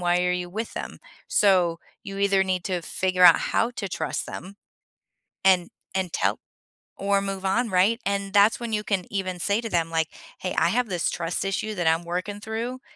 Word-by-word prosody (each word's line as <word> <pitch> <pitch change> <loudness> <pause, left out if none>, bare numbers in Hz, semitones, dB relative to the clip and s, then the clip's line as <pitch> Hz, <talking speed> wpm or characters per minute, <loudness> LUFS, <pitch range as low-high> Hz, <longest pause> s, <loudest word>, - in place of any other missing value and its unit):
why 175 0 +2
are 180 0 +2
you 180 -1 -3
with 220 +4 -4
them? - - -6 0.3
So, 180 -5 +3 0.2
you 195 0 -7
either 195 -1 +3
need 185 -2 -1
to 180 -3 -2
figure 185 +2 +1
out 170 - +9 0.2
how 235 - +3
to 200 -4 -4
trust - - -3
them 195 +3 -8 0.9
and 185 -2 +4 0.2
and 185 -3 -1
tell - - +1 0.6
or 200 0 +1
move 195 -1 -4
on, 230 +5 +1
right? 195 +5 +3
And 200 0 -1
that's 205 +3 +5
when 235 -2 -4
you 210 - 0
can 195 -4 -1
even 185 -2 -2
say 200 +5 +1
to 230 - -5
them, 165 -3 0
like, 160 -1 0 0.3
"Hey, 185 - -3
I 170 - +4
have 245 +2 0
this 175 -3 0
trust 170 +2 -2
issue 210 +2 -2
that 175 -3 -1
I'm 165 +1 +3
working 180 +4 -4
through, 235 +5 -4
190 Hz, 200 wpm, -25 LUFS, 180-205 Hz, 0.9 s, out